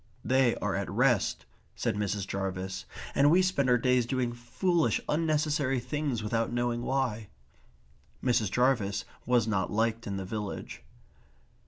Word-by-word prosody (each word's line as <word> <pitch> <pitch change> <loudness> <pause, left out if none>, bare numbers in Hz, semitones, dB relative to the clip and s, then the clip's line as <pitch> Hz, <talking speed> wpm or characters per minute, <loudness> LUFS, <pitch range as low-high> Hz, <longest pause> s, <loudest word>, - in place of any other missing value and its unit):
"They 130 -2 +3
are - - -2
at - - -2
rest," - - +1 0.3
said - - -1
Mrs. 105 -1 -1
Jarvis. 95 -1 -4 0.3
"And 140 +1 +5
we 180 +4 +5
spend 140 -8 +1
our 125 - +5
days 125 0 +2
doing 125 -2 -1
foolish 165 +8 0
unnecessary 150 -4 +1
things 140 -4 -2
without 115 +1 0
knowing 120 0 -1
why." 120 -5 -1 1.0
Mrs. 115 -5 +2
Jarvis 110 -5 +1 0.2
was 120 -3 +3
not 100 -4 0
liked 115 +2 0
in 100 -1 -3
the 95 - -4
village. 105 +1 -5
120 Hz, 140 wpm, -29 LUFS, 105-135 Hz, 1.0 s, And